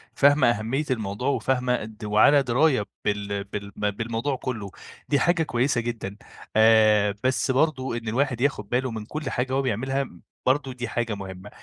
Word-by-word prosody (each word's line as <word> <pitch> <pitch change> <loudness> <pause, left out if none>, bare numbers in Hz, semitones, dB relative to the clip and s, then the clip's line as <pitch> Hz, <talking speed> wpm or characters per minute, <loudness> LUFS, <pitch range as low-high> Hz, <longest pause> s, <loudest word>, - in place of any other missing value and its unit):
فاهمة 140 -3 +5
أهميّة 120 +7 -1
الموضوع، 110 +2 -2
وفاهمة 125 -2 +1
قد 110 0 -8
وعلى 110 +7 +5
دِراية 130 -2 +2 0.2
بال 100 -1 -1
بال 100 0 -7 0.2
بالموضوع 115 +6 -2
كُلّه، 110 -7 -5 0.4
دي 145 - +3
حاجة 170 +1 +2
كويّسة 120 -2 0
جدًا، 110 -4 -5 0.4
آآ 110 -2 +5
بس 130 +1 +1
برضه 130 -3 +1
إن 115 -1 -7
الواحد 125 +1 0
ياخد 120 -7 0
باله 125 +1 0
من 110 -2 -6
كُل 150 +1 -4
حاجة 130 +1 -2
هو 135 - +2
بيعملها 135 +3 -1 0.4
برضه 130 0 +1
دي 125 -1 -5
حاجة 120 -2 -2
مُهمّة. 95 0 -8
120 Hz, 160 wpm, -25 LUFS, 105-135 Hz, 0.4 s, فاهمة